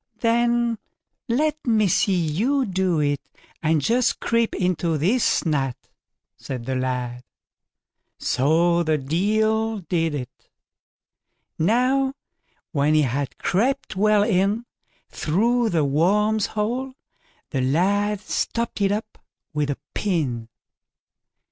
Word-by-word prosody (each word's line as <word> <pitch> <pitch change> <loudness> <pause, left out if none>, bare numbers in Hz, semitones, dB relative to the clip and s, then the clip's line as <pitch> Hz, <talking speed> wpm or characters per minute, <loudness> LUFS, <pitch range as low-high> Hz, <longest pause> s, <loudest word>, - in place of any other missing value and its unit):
then 235 0 +2 0.5
let 295 +6 +1
me 215 -3 +3
see 195 +1 +2
you 245 - +1
do 185 -4 0
it, 145 -1 0 0.4
and 155 -2 +1
just 245 - +2
creep 230 -1 0
into 175 -3 0
this 200 - +2
nut", 135 -5 0 0.6
said 125 -3 -6
the 130 - -2
lad. 125 -1 -2 0.9
So 165 +6 +2
the 155 -2 +1
Deil 215 +9 +1
did 165 -3 -1
it. 130 -1 -8 1.1
Now, 255 - +2 0.6
when 150 -1 +2
he 155 - +4
had 135 +1 -2
crept 260 +8 0
well 210 +1 +4
in 205 +2 +1 0.5
through 230 +8 +1
the 160 -5 +1
worm's 205 +9 +2
hole, 245 +5 -2 0.6
the 135 - 0
lad 195 +9 +1
stopped 230 0 -2
it 195 0 +3
up 215 +1 -4 0.3
with 150 -1 -1
a 145 - -2 0.2
pin. 135 - -1
190 Hz, 110 wpm, -23 LUFS, 150-225 Hz, 1.1 s, he